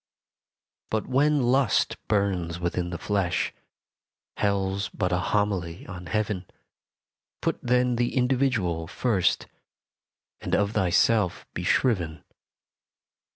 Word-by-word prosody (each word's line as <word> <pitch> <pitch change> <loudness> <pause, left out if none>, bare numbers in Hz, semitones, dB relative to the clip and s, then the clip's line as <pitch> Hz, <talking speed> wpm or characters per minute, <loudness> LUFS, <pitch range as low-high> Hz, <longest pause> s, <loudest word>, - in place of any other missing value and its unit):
But 110 -1 -1
when 145 +1 +2
lust 125 -2 +2
burns 95 -5 0
within 85 0 -1
the 85 - -4
flesh 100 -3 0 0.8
Hell's 100 0 0
but 90 - -2
a 90 - +2
homily 95 -4 -1
on 90 -1 -8
Heaven 105 -1 -1 0.9
Put - - -1
then 125 0 +2
the 120 0 0
individual 125 -11 +1
first, 100 -1 +1 1.0
And - - 0
of 100 0 +1
thyself 100 0 +2
be - - -4
shriven. 90 -11 +1
100 Hz, 105 wpm, -26 LUFS, 90-120 Hz, 1.0 s, when